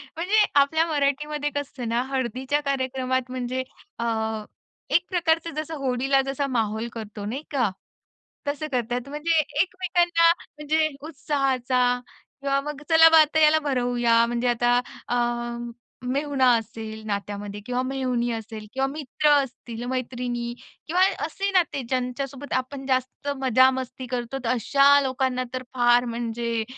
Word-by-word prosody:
म्हणजे 410 +6 +3
आपल्या 315 +4 +3
मराठीमध्ये 295 0 0
कसं 285 - -1
असतं 255 -4 -7
ना 235 +1 +1
हळदीच्या 260 +2 -1
कार्यक्रमात, 260 -1 -1
म्हणजे 255 0 -2 0.4
अ, 235 - -1 0.9
एक 350 - +4
प्रकारचं 330 -2 +1
जसं 310 +1 -4
होळीला 270 +2 +2
जसा 275 +1 -1
माहोल 220 +1 0
करतो, 215 -2 -7
नाही 265 +8 -4
का? 245 -7 +2 0.8
तसं 295 +2 -2
करतात. 245 +1 -2
म्हणजे 315 +2 +1 0.2
एकमेकांना, 345 -2 +3 0.3
म्हणजे 310 +1 +1 0.2
उत्साहाचा 255 -4 +1 0.4
किंवा 275 0 +1
मग 295 0 -6
चला 325 0 +8
बा 320 0 +7
आता 310 +1 +2
याला 310 +1 +6
भरवूया, 240 -2 +3
म्हणजे 240 +1 -1
आता 240 +1 +3 0.3
अ, 245 - 0 0.9
मेहुणा 275 -1 +1
असेल 220 0 -7
नात्यामध्ये 205 0 -4
किंवा 250 0 -1
मेहुणी 255 -2 -1
असेल 220 -1 -6
किंवा 265 0 +1
मित्र 295 +1 -1
असतील, 240 -2 -8
मैत्रिणी 245 -2 -3 0.3
किंवा 360 +3 +1 0.2
असे 395 0 -2
नाते, 340 -7 +2
ज्यांच्यासोबत 260 +3 -3
आपण 265 +1 -2
जास्त 260 +2 -1
मजा-मस्ती 260 0 +2
करतो, 245 +1 -3
तर 230 - -1
अशा 275 +4 +5
लोकांना 260 -1 0
तर 255 0 -3
फार 240 0 +4
म्हणजे 235 -1 -2
260 Hz, 130 wpm, -25 LUFS, 240-290 Hz, 0.9 s, चला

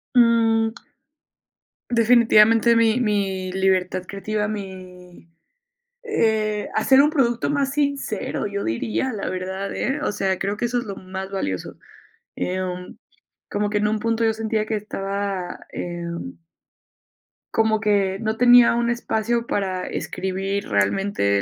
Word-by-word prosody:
Mm. 225 -2 +4 1.2
Definitivamente, 230 -1 +5
mi 230 +1 +3
mi 195 -4 -1
libertad 185 -1 +1
creativa, 210 +1 -2
mi, 185 -4 -9 0.8
eh, 220 - 0
hacer 265 +5 +5
un 295 - +5
producto 240 -6 +1
más 280 -2 0
sincero, 280 -9 -2
yo 200 0 -3
diría, 215 - -1
la 200 - -3
verdad, 190 +2 -4
¿eh? 285 +2 -2
O 210 - 0
sea, 190 -2 -1
creo 200 +2 -2
que 240 - 0
eso 240 +1 -2
es 240 - -3
lo 200 -2 -6
más 190 +1 -7
valioso. 95 - -4 0.6
Em, 180 0 -4 0.5
como 205 0 0
que 210 - 0
en 210 0 +1
un 215 0 0
punto 230 +1 0
yo 220 - +2
sentía 220 -1 -1
que 220 - -2
estaba, 195 -2 -4
em 170 - -5 1.2
como 220 -1 +2
que 200 -3 +1
no 220 0 -1
tenía 245 -1 +7
un 235 0 +1
espacio 235 0 -1
para 190 -4 -2
escribir 190 - -3
realmente 100 - +1
210 Hz, 130 wpm, -22 LUFS, 190-230 Hz, 1.2 s, tenía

